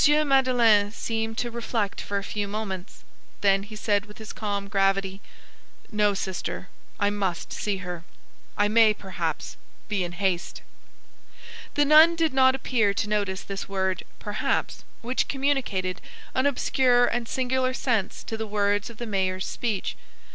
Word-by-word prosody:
Madeleine 245 -7 +4
seemed 225 0 -3
to 240 - -2
reflect 230 -3 -2
for 200 - -3
a 200 - -2
few 205 0 -3
moments; 200 -2 -5 0.4
then 195 -1 +4
he 215 +2 -10
said 205 -1 0
with 210 - -13
his 220 -1 -8
calm 205 -4 -3
gravity:— 195 -1 +1 0.7
"No, 210 -1 +2
sister, 190 -1 -4 0.3
I 205 -1 +2
must 195 -4 -2
see 205 -2 -1
her. 175 -2 -5 0.5
I 205 - +3
may, 215 0 +5
perhaps, 175 -6 -4 0.3
be 205 -3 0
in 175 0 -5
haste." 185 -1 -2 1.1
The 290 - +4
nun 310 +3 +7
did 325 -3 +1
not 260 0 +5
appear 225 -6 +1
to 205 - -1
notice 200 -3 -1
this 195 0 -6
word 190 -1 -1
"perhaps," 205 0 -2 0.2
which 250 +2 0
communicated 260 -10 -1 0.3
an 260 +2 +2
obscure 250 -2 +3
and 240 -1 -1
singular 260 0 0
sense 225 -8 -1
to 225 - -4
the 220 0 -4
words 205 0 +1
of 230 - -12
the 240 - -5
mayor's 190 -3 -1
speech. 220 -6 -2
210 Hz, 150 wpm, -26 LUFS, 195-240 Hz, 1.1 s, nun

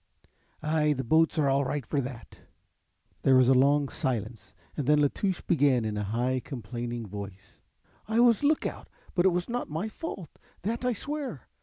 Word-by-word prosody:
"Ay, 150 -1 +2
the 135 -2 -3
boats 160 +7 +3
are 150 -2 +3
all 135 +1 +3
right 140 -1 -2
for 140 +5 0
that." 125 -5 -8 0.8
There 135 - +5
was 130 -1 +5
a - - +7
long 140 +2 +4
silence 120 - -4 0.2
and 145 -4 -3
then 150 0 +5
La 145 -1 +4
Touche 190 -3 -1
began 140 -8 +2
in 110 -1 -2
a 105 - -2
high 120 +5 0
complaining 120 -2 -5
voice: 100 -1 -9 0.5
"I 220 +1 +1
was 240 -2 +5
lookout, 295 +1 0 0.2
but 175 - +2
it - - +4
was 175 0 -1
not 245 +1 -3
my 160 +8 -3
fault, 215 - -8 0.2
that 230 +5 -2
I 250 0 +1
swear. 275 - -5
140 Hz, 180 wpm, -28 LUFS, 120-175 Hz, 0.8 s, a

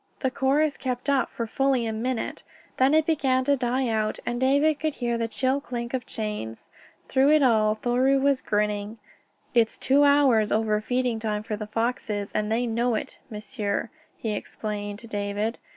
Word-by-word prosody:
The 260 - +1
chorus 280 +3 +1
kept 255 +1 -2
up 270 -3 +2
for 230 - -4
fully 265 +1 +1
a 220 - -2
minute. 240 +2 -3 0.4
Then 265 +3 +4
it 315 -1 +4
began 265 -5 +2
to 285 0 +4
die 255 0 0
out, 220 -1 0
and 240 +1 -2
David 285 +3 +3
could 310 -2 -1
hear 240 -2 -1
the 230 -1 -1
chill 260 +4 0
clink 240 -3 -5
of 255 -1 -3
chains. 210 - -5 0.4
Through 270 +1 +3
it 305 -2 +5
all 215 -4 +3
Thoreau 250 +4 +2
was 275 -1 +2
grinning. 210 +1 -1 0.6
"It's 230 -2 +2
two 280 +2 +3
hours 275 -7 +4
over 215 -1 +1
feeding 245 0 -1
time 210 -1 -2
for 215 -1 -3
the 210 0 -6
foxes, 220 -2 -2
and 215 0 -1
they 235 +2 +1
know 235 +1 0
it, - - -5
m'sieur," 210 -1 -3 0.3
he 220 - -3
explained 205 0 -5
to 230 - -12
David. 205 +1 -2
235 Hz, 180 wpm, -26 LUFS, 215-265 Hz, 0.6 s, it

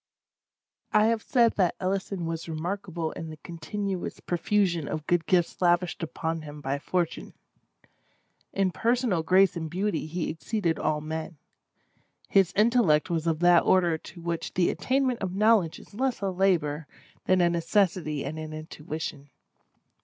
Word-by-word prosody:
I 215 0 +5
have 225 0 +2
said 235 -2 +3
that 185 -4 +2
Ellison 190 -1 -2
was 165 0 -4
remarkable 170 0 -3
in 165 - -7
the 155 - -9
continuous 185 +4 -5
profusion 175 -2 0
of 155 -1 -4
good 175 0 +1
gifts 180 -1 +1
lavished 175 -1 +2
upon 165 0 -3
him 150 -1 -9
by 140 0 -2
Fortune. 175 +2 -2 1.2
In 195 -1 +1
personal 235 -5 +1
grace 185 +4 +4
and 160 -2 -4
beauty 185 -2 -1
he 170 +2 -2
exceeded 170 0 -2
all 155 -1 0
men. 160 +1 -5 0.9
His 190 -2 +4
intellect 210 -8 +3
was 165 -1 -1
of 160 0 0
that 175 -1 +6
order 175 -3 +3
to 165 +2 -11
which 170 -1 -3
the 175 -1 +3
attainment 260 -2 0
of 185 -1 -3
knowledge 210 -5 +3
is - - -16
less 255 +3 -1
a 195 -1 0
labor 165 -6 +1 0.4
than 185 0 +3
a 175 -1 +4
necessity 170 -4 0
and 155 +3 -5
an 155 0 -6
intuition. 155 -2 -6
175 Hz, 150 wpm, -27 LUFS, 160-195 Hz, 1.2 s, that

